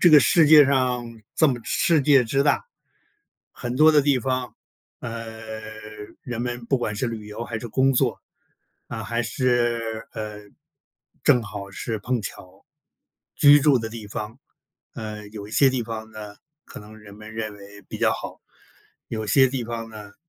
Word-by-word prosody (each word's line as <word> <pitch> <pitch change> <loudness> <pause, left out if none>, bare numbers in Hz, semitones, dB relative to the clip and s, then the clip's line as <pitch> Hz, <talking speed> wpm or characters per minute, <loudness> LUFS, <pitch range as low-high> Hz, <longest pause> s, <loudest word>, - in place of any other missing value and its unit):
这 175 - +6
个 150 - +10
世 160 +3 +5
界 150 -2 +9
上， 125 -4 -1
这 160 - +5
么 125 -4 0
世 160 +4 +2
界 135 -2 +5
之 135 +4 +1
大， 145 - +2 0.9
很 120 0 -5
多 155 +3 +7
的 150 -1 +5
地 140 -2 +3
方， 130 0 -3 0.4
呃， 110 -1 -7 0.6
人 120 -2 -4
们 120 -1 -4
不 135 - +2
管 110 -4 -3
是 125 - -1
旅 110 -3 -6
游 110 +3 -6
还 120 - -5
是 120 - -6
工 135 +4 +3
作， 125 - +1 0.7
啊， 110 -1 -5
还 115 +4 -1
是， 120 -3 -1
呃， 105 -1 -6 0.8
正 125 - +5
好 100 -3 -7
是 110 +3 -4
碰 120 +2 -1
巧 95 -1 -10 0.7
居 145 0 +7
住 140 -3 +4
的 110 -1 -4
地 110 -2 -9
方， 110 +5 -6 0.5
呃， 105 -3 -7
有 105 -1 -8
一 105 - -13
些 135 +1 +5
地 130 -2 -2
方 110 -1 -6
呢， 105 -2 -9 0.3
可 - - -11
能 105 +1 -13
人 105 -2 -13
们 110 +1 -11
认 110 -1 -4
为 100 0 -13
比 - - -8
较 - - +2
好， - - -7 0.7
有 110 -1 -4
些 130 +6 +5
地 130 -1 -3
方 115 -1 -5
呢， 105 -2 -11
115 Hz, 185 characters per minute, -24 LUFS, 110-130 Hz, 0.9 s, 个